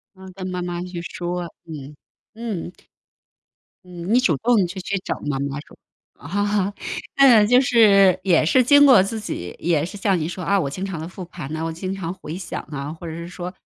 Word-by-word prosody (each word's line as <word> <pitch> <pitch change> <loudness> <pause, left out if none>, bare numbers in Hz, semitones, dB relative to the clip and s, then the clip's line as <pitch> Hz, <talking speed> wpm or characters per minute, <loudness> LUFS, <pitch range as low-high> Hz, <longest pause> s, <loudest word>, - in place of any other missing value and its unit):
啊， 190 0 -12
跟 185 -1 -6
妈 180 -1 -3
妈 175 -1 -4
去 180 -1 -6
说， 175 +1 -4 0.2
嗯， 150 -3 -9 0.4
嗯。 215 -6 -5 1.1
嗯， 180 +4 -3
你 - - +6
主 195 - +3
动 225 -6 +3
去 190 +2 -7
去 195 +2 -2
找 - - -3
妈 140 -2 -1
妈 140 +1 -3
说。 - - -17 0.4
啊， 205 +4 -1 0.4
嗯， 240 -7 +7
就 250 +3 +5
是 205 -7 +5
也 170 -5 +3
是 255 +8 +5
经 285 +3 +7
过 250 -8 +7
自 220 +3 -3
己 90 - -5
也 165 -3 +1
是 185 - -7
像 195 -2 +1
你 155 - -2
说 180 +1 -6
啊， 200 +3 +2
我 140 -6 -1
经 190 +6 -5
常 180 -4 -5
地 160 - -5
复 185 0 -8
盘 155 -4 -7
啊， 160 - -3
我 165 - -2
经 185 +4 -4
常 180 -2 -4
回 175 -3 -8
想 170 -4 -5
啊， 145 +1 -5
或 165 +1 -9
者 160 - -5
是 170 +1 -7
说 180 0 -6
180 Hz, 225 characters per minute, -22 LUFS, 165-200 Hz, 1.1 s, 嗯